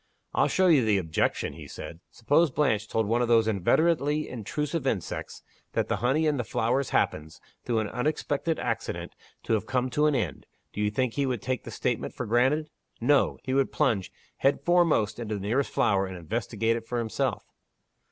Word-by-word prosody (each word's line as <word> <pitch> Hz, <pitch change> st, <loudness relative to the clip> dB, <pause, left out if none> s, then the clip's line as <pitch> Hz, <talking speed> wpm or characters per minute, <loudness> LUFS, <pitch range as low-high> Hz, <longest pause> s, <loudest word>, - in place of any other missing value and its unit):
"I'll -, -, +3 dB
show 190 Hz, -, +2 dB
you 155 Hz, -8 st, +5 dB
the 105 Hz, -2 st, +3 dB
objection," 80 Hz, -3 st, -1 dB
he 75 Hz, -1 st, -10 dB
said. 80 Hz, -, -8 dB
"Suppose 145 Hz, +8 st, +2 dB
Blanche 110 Hz, -7 st, +1 dB
told 110 Hz, 0 st, 0 dB
one 115 Hz, +4 st, +1 dB
of 120 Hz, -, +1 dB
those 115 Hz, -1 st, +4 dB
inveterately 150 Hz, -, +2 dB
intrusive 140 Hz, +5 st, -3 dB
insects 95 Hz, -9 st, -3 dB, 0.3 s
that -, -, 0 dB
the -, -, +1 dB
honey 135 Hz, +6 st, +1 dB
in 150 Hz, -2 st, +2 dB
the 120 Hz, -, -1 dB
flowers 120 Hz, +4 st, 0 dB
happens, 80 Hz, +1 st, -1 dB, 0.2 s
through 120 Hz, -2 st, -1 dB
an 110 Hz, -, -2 dB
unexpected 150 Hz, +5 st, -1 dB
accident, -, -, -3 dB, 0.3 s
to -, -, -1 dB
have 110 Hz, -, 0 dB
come 130 Hz, -1 st, 0 dB
to 150 Hz, +4 st, +3 dB
an 150 Hz, -, +2 dB
end 125 Hz, -, -3 dB, 0.3 s
do 105 Hz, -, -3 dB
you 105 Hz, -, +2 dB
think 125 Hz, +2 st, -1 dB
he 140 Hz, -1 st, 0 dB
would 125 Hz, -5 st, -2 dB
take 130 Hz, 0 st, -2 dB
the -, -, -6 dB
statement -, -, -2 dB
for -, -, -4 dB
granted? 135 Hz, +7 st, +2 dB, 0.3 s
No. 140 Hz, +4 st, +3 dB
He 130 Hz, -, -2 dB
would 135 Hz, 0 st, +2 dB
plunge 115 Hz, -11 st, 0 dB, 0.3 s
head 140 Hz, +1 st, +2 dB
foremost 155 Hz, -12 st, +2 dB
into 110 Hz, -2 st, -3 dB
the 100 Hz, -, -5 dB
nearest 120 Hz, +8 st, 0 dB
flower, 95 Hz, -1 st, +2 dB
and 95 Hz, -1 st, -7 dB
investigate 115 Hz, +5 st, -1 dB
it 115 Hz, -1 st, -9 dB
for 120 Hz, -, -2 dB
himself." 115 Hz, -2 st, -1 dB
120 Hz, 190 wpm, -27 LUFS, 110-145 Hz, 0.3 s, you